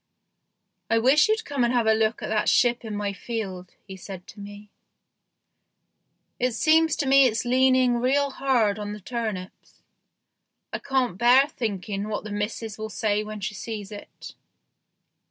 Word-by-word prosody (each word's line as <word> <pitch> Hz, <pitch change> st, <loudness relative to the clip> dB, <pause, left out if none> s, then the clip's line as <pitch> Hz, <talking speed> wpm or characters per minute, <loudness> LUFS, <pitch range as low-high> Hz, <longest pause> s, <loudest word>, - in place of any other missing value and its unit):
" -, -, -53 dB
I 225 Hz, -, +3 dB
wish 270 Hz, -, +4 dB
you'd 440 Hz, +1 st, 0 dB
come 280 Hz, -4 st, -1 dB
and 240 Hz, -, +2 dB
have 240 Hz, -2 st, +1 dB
a 220 Hz, -, +4 dB
look 220 Hz, 0 st, 0 dB
at -, -, -4 dB
that 215 Hz, -1 st, +1 dB
ship 240 Hz, -1 st, +2 dB
in 220 Hz, -2 st, -5 dB
my 205 Hz, -1 st, -2 dB
field," 195 Hz, -4 st, -6 dB
he 190 Hz, -, -9 dB
said 185 Hz, -1 st, -9 dB
to -, -, -13 dB
me; 205 Hz, 0 st, -11 dB, 0.8 s
" -, -, -51 dB
it 250 Hz, -1 st, 0 dB
seems 320 Hz, +5 st, +3 dB
to 290 Hz, -, -2 dB
me 270 Hz, 0 st, +6 dB
it's 225 Hz, 0 st, -2 dB
leaning 255 Hz, 0 st, +3 dB
real 275 Hz, +3 st, +1 dB
hard 240 Hz, -7 st, +1 dB
on 205 Hz, 0 st, -5 dB
the 210 Hz, -, -8 dB
turnips. 210 Hz, -3 st, -6 dB, 0.9 s
I -, -, -2 dB
can't 255 Hz, -8 st, -1 dB
bear 255 Hz, +4 st, +5 dB
thinking 205 Hz, -5 st, -4 dB
what 210 Hz, -1 st, -4 dB
the 215 Hz, -, -8 dB
missus 210 Hz, +1 st, -4 dB
will 220 Hz, 0 st, -5 dB
say 210 Hz, +1 st, -1 dB
when 215 Hz, -1 st, -8 dB
she 205 Hz, +2 st, -3 dB
sees 210 Hz, -1 st, -7 dB
it." 205 Hz, -, -11 dB
220 Hz, 170 wpm, -25 LUFS, 205-255 Hz, 0.9 s, me